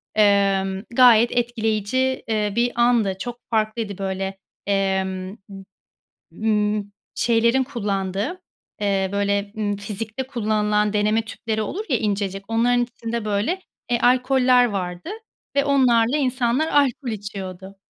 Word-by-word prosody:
emm, 195 -2 +2
gayet 240 -2 +6
etkileyici, 240 +2 0
eee, 210 -2 0
bir 235 0 +1
andı. 225 -6 +3
Çok 240 +2 -5
farklıydı 215 -2 -1
böyle, 195 0 -3 0.3
emm, 190 0 -1
m 195 -1 -9 0.7
ımm, 210 -1 0 0.2
şeylerin 235 +2 +2
kullandığı, 205 - -3 0.4
eee, 195 -2 +1
böyle, 200 0 0
ımm, 205 -1 -1
fizikte 215 +4 -5
kullanılan 210 -4 0
deneme 210 +2 +2
tüpleri 220 0 -3
olur 380 - -4
ya 255 - +2
incecik, 200 -2 -2
onların 245 +2 +3
içinde 235 -2 -5
böyle, 215 - -1 0.3
eee, 240 - +2
alkoller 250 0 +4
vardı 180 - -3 0.5
ve 280 - +4
onlarla 255 -3 +3
insanlar 260 +1 +1
alkol 275 -3 +1
içiyordu. 195 -3 -6
215 Hz, 115 wpm, -22 LUFS, 200-240 Hz, 0.7 s, gayet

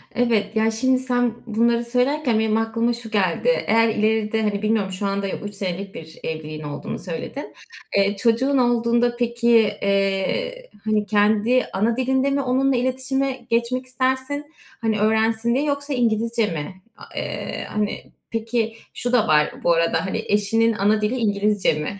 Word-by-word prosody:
Evet. 225 -4 +1
Ya, 220 0 +2
şimdi 255 +3 +2
sen 245 -2 +1
bunları 235 +1 +1
söylerken 250 0 +1
benim 220 0 +1
aklıma 230 +1 0
şu 235 -2 -6
geldi: 200 - +1 0.2
Eğer 225 +1 +4
ileride, 220 0 +1
hani, 205 -2 -1
bilmiyorum 215 -3 0
şu 185 +2 -4
anda 195 0 -1
3 205 +1 -5
senelik 195 0 -4
bir 160 0 -10
evliliğin 155 -1 -5
olduğunu 145 -1 -5
söyledin. 185 - -6 0.4
Eee, 200 +1 +2
çocuğun 245 +5 +2
olduğunda 240 -1 +2
peki, 235 0 0 0.3
eee, 200 - -1 0.2
hani, 215 -1 +1
kendi 215 +4 +3
ana 225 +4 +1
dilinde 265 +1 +1
mi 280 0 +1
onunla 265 +1 +1
iletişime 260 +2 0 0.2
geçmek 240 +2 0
istersin? 260 +4 -2 0.3
Hani, 220 -2 0
öğrensin 220 +2 +2
diye 275 - +1
yoksa 285 0 -2
İngilizce 230 -1 +1
mi? 170 +3 -6 0.2
A - - -14
eee, - - -4
hani 210 -1 -2 0.3
Peki, 225 0 -2 0.2
şu 245 - -2
da 245 -4 +4
var 150 -1 +3
bu 170 - +4
arada, 165 +2 +1
hani, 220 +4 -2
eşinin 225 +3 +2
ana 210 +1 +2
dili 210 +4 0
İngilizce 205 -3 +1
mi? 150 +6 -4
225 Hz, 155 wpm, -22 LUFS, 205-245 Hz, 0.4 s, Eğer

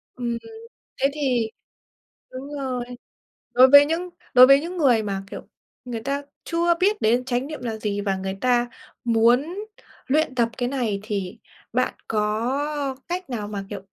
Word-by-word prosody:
Ừm, 235 -2 -2 0.6
thế 275 - +4
thì 250 -7 0 0.8
đúng 275 +3 -8
rồi. 255 -3 -3 0.7
Đối 255 +1 +7
với 285 +1 +9
những 340 +4 -2 0.2
đối 255 0 +9
với 275 +1 +7
những 355 +3 -6
người 245 -8 +3
mà, 195 -1 -3
kiểu, - - -8 0.4
người 235 -3 -5
ta 280 +3 -2 0.2
chưa 340 0 +2
biết 415 +3 +2
đến 240 +3 +2
chánh 255 +1 -1
niệm 305 -4 -7
là 225 -2 -3
gì 205 -1 -2
và 195 -2 0
người 190 0 -4
ta 245 -1 +2 0.4
muốn 240 +9 +3 0.5
luyện 295 -1 +1
tập 235 -2 +2
cái 245 -1 -1
này 235 -7 -1
thì 200 -4 -4 0.4
bạn 255 +1 +1
có 265 +7 -1
cách 355 -2 -4
nào 215 -4 -4
mà, 200 -2 -5
kiểu, 200 -2 -6
250 Hz, 165 wpm, -23 LUFS, 220-285 Hz, 0.8 s, với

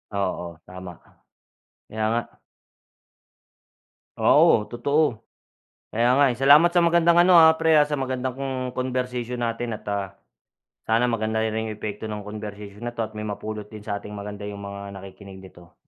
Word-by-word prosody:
Oo 90 -3 -3
tama 90 0 -9
ka, - - -25 0.8
kaya 110 0 -4
nga. 120 +1 -3 1.8
Oo 105 - +5
totoo. 125 -1 0 0.7
Kaya 120 +2 +2
nga 145 - +6
eh, 120 - -11
salamat 145 +5 +6
sa 175 - +4
magandang 170 0 +4
ano, 180 +1 +5
ah, 160 -1 +8
pre, 160 -1 +4
ah, 150 - +5
sa 150 - -5
magandang 130 -1 -3 0.4
conversation 125 -1 -3
natin 115 0 -3
at, - - -22
ah, 100 -1 -4 0.7
sana 115 +2 +2
maganda 110 -1 -1
ri 110 - 0
rin 110 0 -2
yung - - -5
epekto 105 +1 -5
ng 105 -1 -6
conversation 105 0 -8
na 120 - -5
to 115 - -2
at - - -17
may 105 - -5
mapulot 105 +1 -5
din 105 -1 -10
sa 100 - -2
ating 105 - -9
maganda 105 0 -7
yung 100 -1 -7
mga 100 0 -7
nakikinig 95 0 -12
nito. 90 -2 -16
110 Hz, 165 wpm, -24 LUFS, 100-130 Hz, 1.8 s, ah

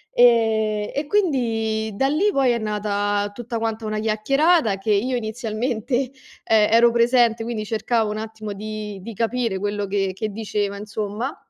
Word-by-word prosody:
E 220 -3 +3
e 285 +1 -2
quindi 225 - 0
da 270 - +1
lì 335 +9 +2
poi 270 -5 +3
è 235 - 0
nata 205 -1 -1
tutta 235 +1 -5
quanta 225 0 -3
una 215 0 -2
chiacchierata, 225 - +2
che 210 +2 -2
io 250 +6 +1
inizialmente 230 +2 -2 0.5
e 215 -1 +3
ero 235 +1 +6
presente, 235 -1 +3
quindi 225 -2 -3
cercavo 220 0 0
un 215 - -4
attimo 220 -1 -6
di 210 -1 -6
di 225 +1 -8
capire 230 -2 -1
quello 205 +1 -2
che 195 -1 0
che 215 +3 -3
diceva, 205 -1 -3
insomma, 210 +5 -4
220 Hz, 155 wpm, -22 LUFS, 210-240 Hz, 0.5 s, ero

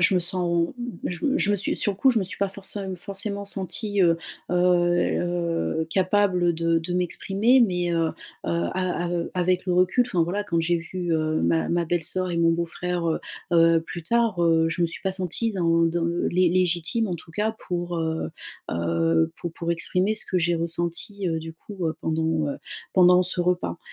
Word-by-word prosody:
je 180 +2 +4
me 180 - +3
sens 175 +1 0 0.3
je 175 -1 -4
me 285 +1 +2
je 205 - +3
me 205 - +2
suis 195 - 0
sur 205 - 0
le - - -12
coup 265 +6 +4
je 235 - +2
me 190 - -1
suis 185 - -4
pas 200 -1 -1
forçé 200 +1 -1 0.2
forcément 200 +2 -4
sentie, 195 +1 0
heu 170 -1 +3 0.3
heu - - 0
heu, 175 -2 +1
capable 185 -1 +2
de 165 0 +1
de 170 +2 -5
m'exprimer, 195 +7 +2
mais 180 -6 +1
heu 165 -1 +1
heu, - - -3 0.3
a 175 - -1
av 170 -1 -2
avec 180 0 0
le 180 - 0
recul 185 +7 +3
enfin 180 -8 +1
voilà 190 +5 -2
quand 170 -4 0
j'ai 170 +1 +1
vu, 175 +1 -5
heu, 155 0 0
ma 165 - +1
ma 170 -1 0
belle-soeur 175 +2 0
et 170 - -2
mon 165 0 +4
beau-frère, 170 +1 -2
heu 160 - 0 0.3
heu, 165 -1 +5
plus 170 +1 -8
tard, 230 +1 +1
heu, 165 -1 +3
je 175 +2 -1
me 170 - +4
suis 165 - -8
pas 190 -1 -1
sentie 190 +4 -1
dans 165 -3 +2
dans 165 0 -1
le 170 +1 0
lé 180 0 +3
légitime 180 +5 +1
en 175 - -2
tout 165 0 -11
cas 215 +5 -2
pour, 175 -1 -3
heu 160 0 -2 0.4
heu, 80 -1 +1
pour 175 - -4
pour 170 0 -2
exprimer 185 +4 0
ce 215 - -1
que 185 - -1
j'ai 175 0 +2
ressenti, 170 +4 -1
heu, 165 -1 -1
du 160 0 -8
coup, 185 0 -6
heu, 160 - -3
pendant, 160 -1 0
heu, 140 - -3 0.4
pendant 180 -1 +6
ce 180 0 -2
repas. 180 0 0
175 Hz, 205 wpm, -24 LUFS, 165-185 Hz, 0.4 s, pendant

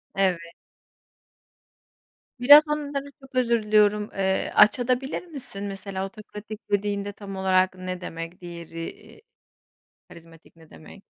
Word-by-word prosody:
Evet. 190 -3 +2 2.0
Biraz 290 +5 +9
onları, 285 -2 -3
çok 270 -1 -16
özür 235 -3 +2
diliyorum, 210 0 +3
eee, 190 -1 0
açabilir 250 - +3
misin 270 - -9
de? 205 - -3
Mesela, 195 -1 -5
otokratik 210 +1 -10
dediğinde 205 0 -1
tam 195 -1 -9
olarak 185 -1 +2
ne 185 0 -5
demek? 165 +1 -7
Diğeri 170 -1 -7 0.3
i - - -20 0.9
karizmatik 165 0 -16
ne 160 -1 -19
demek? 195 +5 -14
200 Hz, 120 wpm, -25 LUFS, 185-235 Hz, 2.0 s, Biraz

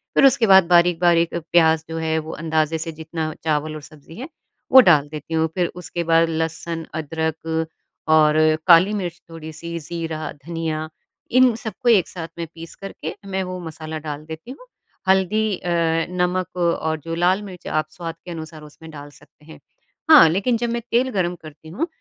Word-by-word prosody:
फिर - - +6
उसके 265 -4 +4
बाद 190 -3 +7
बारीक-बारीक 170 -1 +3 0.2
प्याज़ 160 -2 +4
जो 165 - -4
है 160 0 -1
वो 155 +1 -7
अंदाजे 160 0 0
से 165 +1 -5
जितना 160 0 -5
चावल 155 0 -1
और 155 - -7
सब्ज़ी 155 +1 -15
है, 255 +8 -7 0.4
वो 260 - +10
डाल 150 - +4
देती 155 +1 -8
हूँ। 160 0 +2
फिर 180 -2 +1
उसके 175 -1 -5
बाद 165 0 +3
लहसुन, 165 0 -3
अदरक 160 +1 -3 0.4
और 155 -1 +5 0.3
काली 180 +4 +6
मिर्च 175 -5 -4
थोड़ी-सी, 165 +1 -7
ज़ीरा, 160 0 -5
धनिया 160 -2 -3 0.4
इन 255 0 +5
सबको 230 +2 -3
एक 205 -7 +4
साथ 165 -3 -7
में 165 -1 -4
पीस 165 0 -10
करके 195 - -7
मैं 190 -1 -2
वो 185 0 -6
मसाला 160 0 -7
डाल 150 -1 -7
देती 160 +9 -9
हूँ, 395 - -13 0.4
हल्दी 195 +2 +2
अ, 175 - -6 0.4
नमक 180 0 -2
और 160 -2 0
जो 165 - -3
लाल 180 +4 +2
मिर्च 185 -3 -10
आप 155 0 -1
स्वाद 165 0 -7
के 175 - -7
अनुसार 160 -1 -8
उसमें 160 +2 -13
डाल 145 -1 -10
सकते 150 - -22
हैं। 160 - -13 0.5
हाँ, 300 - +9
लेकिन 205 +8 +1
जब 240 0 -2
मैं 235 0 -2
तेल 255 +2 +2
गर्म 180 -3 -1
करती 155 0 -13
हूँ, 305 - -2
165 Hz, 180 wpm, -21 LUFS, 160-185 Hz, 0.5 s, वो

